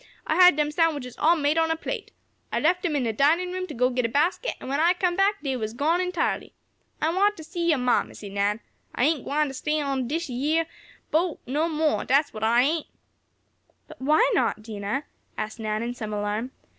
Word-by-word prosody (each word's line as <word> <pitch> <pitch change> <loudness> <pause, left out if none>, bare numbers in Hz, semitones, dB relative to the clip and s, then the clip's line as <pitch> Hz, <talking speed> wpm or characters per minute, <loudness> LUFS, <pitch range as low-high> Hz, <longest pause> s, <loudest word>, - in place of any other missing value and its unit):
I - - 0
had 360 -3 +7
dem 300 0 0
sandwiches 300 -6 0
all 330 +3 +5
made 305 0 +1
an' 325 - +4
on - - -4
a 325 - +1
plate. 325 - -5 0.4
I - - 0
left 355 +3 +2
dem 335 -5 -1
in 275 - +1
de 225 -2 -1
dinin' 325 - +2
room 370 0 -3
to 300 - -8
go 250 +2 +2
git 250 0 0
a - - -8
basket, 330 - 0
an' - - -9
when 275 +2 -1
I 340 +3 +4
come 355 -1 0
back, 400 0 +2
dey 270 -2 -1
was 220 -1 -4
gone 320 +7 +1
entirely. 360 -2 -2 0.4
I 315 - +1
want 410 +2 +3
t' 315 - -8
see 340 +1 -2
yo' 310 - +4
ma, 250 -1 +3
Missie 205 - -10
Nan. 200 +2 0 0.3
I - - +1
ain't 300 -1 +2
gwing 300 +2 +1
t' - - -7
stay 300 +3 -1
on 275 -4 -1
dish 325 +5 -2
yeah 290 +6 0 0.5
boat 330 +1 +1
no 300 +6 0
mo, 310 -1 +1
dat's 285 +2 +2
what 215 -1 -6
I 235 +2 +4
ain't!" 310 +3 0 1.0
"But - - -14
why 305 - +4
not, 215 - 0
Dinah?" 215 +4 -3 0.3
asked 215 +2 -4
Nan, 215 0 -2
in 240 +1 -3
some 215 -3 -6
alarm. 210 +4 -2
295 Hz, 225 wpm, -25 LUFS, 245-330 Hz, 1.0 s, had